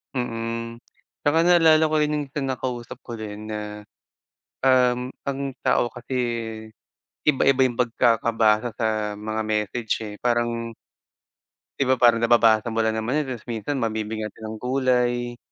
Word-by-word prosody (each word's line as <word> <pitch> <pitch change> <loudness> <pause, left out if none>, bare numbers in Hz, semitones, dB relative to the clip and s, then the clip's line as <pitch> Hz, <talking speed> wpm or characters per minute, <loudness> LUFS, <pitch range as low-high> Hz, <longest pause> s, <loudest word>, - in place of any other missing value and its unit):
Mm, 115 -1 -3 0.4
'tsaka 145 +3 +2
naalala 165 -3 +5
ko - - +2
rin 150 0 +1
yung 145 -1 -2
sa 150 - -3
nakausap 125 -2 -4
ko 120 -2 -7
rin 105 0 -7
na, 105 0 -6 0.8
um, 125 -1 +3 0.2
ang 140 0 -2 0.3
tao 120 - +3
kasi 120 +2 -9 1.1
iba-iba 135 -2 +3
yung 120 -1 -2
pagkakabasa 115 -1 +2
sa 110 -2 -1
mga 110 +1 -3
message, 110 +2 -1
eh, 105 - -7
parang 120 -1 0 1.1
Di 135 - +2
ba 130 - +4
parang 120 -2 +5
nababasa 115 -1 +3
mo 115 - +1
lang 110 0 0
naman 125 +7 0
yun - - -4
tapos 120 -4 -6
minsan 120 +4 -3
mabibgyan 110 -2 -2
natin 110 -1 -8
ng 110 - -6
kulay. 125 -1 0
120 Hz, 145 wpm, -24 LUFS, 110-130 Hz, 1.1 s, naalala